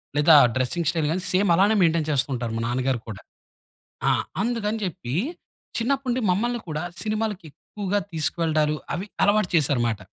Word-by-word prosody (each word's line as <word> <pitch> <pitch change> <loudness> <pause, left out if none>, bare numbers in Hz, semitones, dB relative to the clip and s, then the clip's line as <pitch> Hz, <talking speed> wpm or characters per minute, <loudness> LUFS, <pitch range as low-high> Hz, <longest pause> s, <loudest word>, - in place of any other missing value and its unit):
లేదా 150 +2 +6 0.2
dressing 145 +6 -1
style 160 -3 0
గాని 180 +2 -1
same 190 +1 +2
అలానే 205 +4 +4
మెయిన్‌టేన్ 165 -2 +2
చేస్తూ 140 0 +1
ఉంటారు, 120 -2 -3
మా - - -2
నాన్న 125 +2 -1
గారు 125 -3 0
కూడా. 105 - -7 0.9
ఆ! - - +5 0.3
అందుకని 225 -2 -1
చెప్పి 170 -8 -5 0.6
చిన్నప్పటి 270 +3 -1
నుండి 245 +1 0
మమ్మల్ని 240 +5 0
కూడా 155 +1 -3 0.2
సినిమాలకి 215 -4 -2
ఎక్కువగా 205 +3 -3
తీసుకువెళ్లడాలు, 155 -1 0 0.2
అవి 190 - -4 0.2
అలవాటు 205 -2 +3
చేసారు 140 -5 +2
మాట. 110 -3 -2
170 Hz, 160 wpm, -24 LUFS, 150-210 Hz, 0.9 s, లేదా